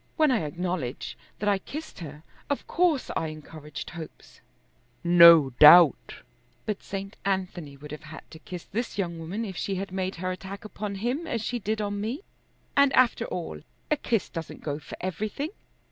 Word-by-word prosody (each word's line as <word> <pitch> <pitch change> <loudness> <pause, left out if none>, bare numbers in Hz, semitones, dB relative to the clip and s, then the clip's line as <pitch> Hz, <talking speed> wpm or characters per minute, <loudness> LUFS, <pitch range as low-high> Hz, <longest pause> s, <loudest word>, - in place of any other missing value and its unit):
When 310 -3 +4
I 245 - +3
acknowledge 170 -5 -3 0.2
that 210 - -3
I 200 -1 +3
kissed 305 +7 -8
her, 150 -2 -9 0.3
of 285 - -1
course 335 -6 +1
I 160 - 0
encouraged 155 -1 -8
hopes." 160 -2 -11 0.6
"No 170 -5 +8
doubt." 155 -1 +8 0.5
"But 210 -2 -2
St. 195 0 -6
Anthony 185 -7 -2
would 150 +1 -11
have 150 +1 -8
had 155 +1 -10
to 160 - -11
kiss 175 +1 -8
this 230 +2 -4
young 170 -4 -2
woman 190 +8 -4
if 190 -3 -6
she 195 +2 -2
had 195 0 -4
made 190 0 -2
her 185 +2 -3
attack 195 +3 -7
upon 210 -1 -5
him 245 - -2
as 230 -7 -2
she 245 +1 -2
did 215 +1 -2
on 205 -1 -2
me; 240 - -3 0.5
and 280 -1 +5
after 255 -3 +4
all 120 - -5 0.3
a - - +5
kiss 235 -7 -1
doesn't 165 -2 -7
go 145 -1 -3
for 150 - -10
everything. 215 - -3
190 Hz, 175 wpm, -27 LUFS, 160-215 Hz, 0.6 s, No